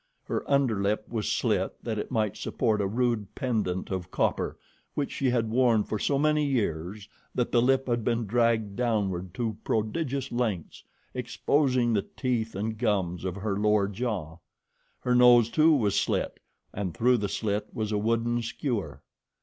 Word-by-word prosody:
Her - - -2
under 135 -7 +2
lip 105 +2 0
was 110 -2 -2
slit 105 -5 0
that 110 -3 -2
it - - -4
might 110 -4 0
support 110 -3 0
a 100 - +1
rude 115 -2 -1
pendant 105 -9 -1
of 95 -1 -3
copper - - 0 0.4
which 145 - -1
she 135 - 0
had 115 -3 0
worn 120 -3 +3
for 110 - -3
so 140 - +1
many 150 +1 +2
years 100 - -2 0.3
that 125 - 0
the 120 - +4
lip 135 +2 +2
had 120 -2 0
been 115 0 0
dragged 115 -2 +1
downward 100 -7 -1
to 110 -3 -2
prodigious 130 +5 -1
lengths, 110 -9 -2 0.3
exposing 130 -5 +1
the 100 - +2 0.2
teeth 115 -4 -1
and 110 +2 -3
gums 95 -7 0
of 95 -1 -3
her 100 0 -2
lower 105 0 +2
jaw. 100 -6 -3 0.6
Her 125 - +1
nose, 120 -2 +6
too, 155 +1 +5
was 110 -10 +2
slit, - - -1 0.3
and 95 -4 -4
through 125 +1 +4
the 100 -3 -2
slit 105 0 -1
was 110 -1 -3
a 105 - +1
wooden 115 +2 +1
skewer. 115 -1 -3
110 Hz, 165 wpm, -28 LUFS, 100-125 Hz, 0.6 s, nose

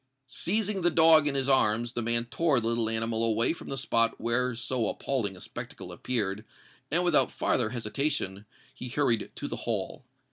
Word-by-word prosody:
Seizing 195 - -1
the 175 - +3
dog 160 -2 +6
in 140 - -1
his 135 -1 0
arms, 120 -3 +3
the 120 - -2
man 115 +1 +1
tore 145 +2 +1
the 110 - -5
little 115 -1 0
animal 115 0 -1
away 115 +4 +2
from - - -11
the 135 - -4
spot 115 -5 0
where 120 +2 0
so 120 -1 -2
appalling 105 -9 -2
a - - -12
spectacle - - -8
appeared; 105 -4 -2 0.5
and, 175 +4 +2
without 175 -4 +3
farther 120 -3 0
hesitation, 115 -4 -2 0.3
he 125 -1 -8
hurried 120 -5 0
to - - -5
the - - -5
Hall. - - -4
120 Hz, 180 wpm, -28 LUFS, 115-145 Hz, 0.5 s, dog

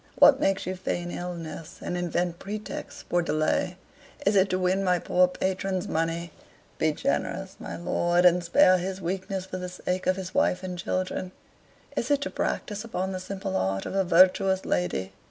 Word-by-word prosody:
What - - +7
makes 195 0 +1
you 185 - -2
feign 175 -1 -3
illness, 170 -2 -6
and 180 - -4
invent 175 0 -1
pretexts 210 +2 -6
for 175 - +2
delay? 165 +3 0 0.5
Is 200 +1 +3
it 190 0 +4
to 185 - +1
win 185 +1 +1
my 180 -1 +3
poor 180 +1 +3
patron's 190 0 -2
money? 165 +1 -1 0.5
Be 160 - +3
generous, 195 - -2
my - - -6
lord, 175 +1 +1
and 180 0 +5
spare 185 +2 +5
his 190 +1 -3
weakness 190 +1 -3
for 185 0 -5
the 180 0 -4
sake 180 0 -3
of 185 - +4
his 185 -1 -6
wife 180 +1 +2
and 185 -1 -4
children. 185 +1 -2 0.6
Is - - -1
it 285 -1 +3
to - - -3
practise 205 0 -2
upon 190 -4 -3
the 185 - -3
simple 190 +1 -5
heart 95 - 0
of - - -4
a 195 0 +2
virtuous 190 +2 +4
lady? 90 +1 -1
185 Hz, 180 wpm, -27 LUFS, 175-190 Hz, 0.6 s, What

